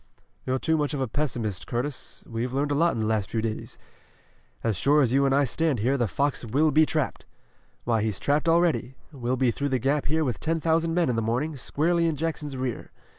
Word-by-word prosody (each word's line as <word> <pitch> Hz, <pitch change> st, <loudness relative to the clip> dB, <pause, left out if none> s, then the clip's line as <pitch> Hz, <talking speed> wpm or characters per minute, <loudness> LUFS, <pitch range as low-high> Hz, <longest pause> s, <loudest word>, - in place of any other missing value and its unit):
"You're 130 Hz, 0 st, +1 dB
too 160 Hz, +4 st, +1 dB
much 150 Hz, 0 st, -1 dB
of -, -, -3 dB
a 130 Hz, -, 0 dB
pessimist, 115 Hz, -6 st, -3 dB
Curtis. 130 Hz, +4 st, -4 dB
We've 120 Hz, +2 st, -3 dB
learned 140 Hz, +2 st, 0 dB
a -, -, +3 dB
lot 165 Hz, +4 st, +2 dB
in 115 Hz, -, -2 dB
the -, -, 0 dB
last 110 Hz, -3 st, 0 dB
few 115 Hz, -, -1 dB
days. 110 Hz, -1 st, -4 dB, 0.9 s
As 115 Hz, -3 st, +1 dB
sure 145 Hz, +9 st, +3 dB
as 125 Hz, -1 st, +1 dB
you 140 Hz, +1 st, +4 dB
and 135 Hz, -, +2 dB
I 140 Hz, -, +4 dB
stand 150 Hz, +2 st, 0 dB
here 125 Hz, +6 st, +1 dB
the 120 Hz, -4 st, +1 dB
fox 140 Hz, +7 st, 0 dB
will 145 Hz, +7 st, +2 dB
be 155 Hz, +2 st, +5 dB
trapped. 155 Hz, -3 st, -2 dB, 0.6 s
Why, 115 Hz, -2 st, +1 dB
he's 105 Hz, -3 st, -1 dB
trapped 150 Hz, +3 st, +1 dB
already. 165 Hz, -6 st, +2 dB, 0.2 s
We'll 130 Hz, -3 st, -2 dB
be 125 Hz, -2 st, +3 dB
through 140 Hz, +4 st, -2 dB
the 130 Hz, -, +1 dB
Gap 135 Hz, +4 st, 0 dB
here 160 Hz, +2 st, +1 dB
with 125 Hz, -8 st, -2 dB
ten 165 Hz, +1 st, -1 dB
thousand 165 Hz, +1 st, +1 dB
men 175 Hz, -2 st, +2 dB
in 120 Hz, -, 0 dB
the -, -, +1 dB
morning, 125 Hz, +8 st, -1 dB
squarely 165 Hz, +6 st, +1 dB
in 160 Hz, -, 0 dB
Jackson's 150 Hz, -3 st, -3 dB
rear. 130 Hz, -2 st, -4 dB
140 Hz, 230 wpm, -26 LUFS, 120-155 Hz, 0.9 s, be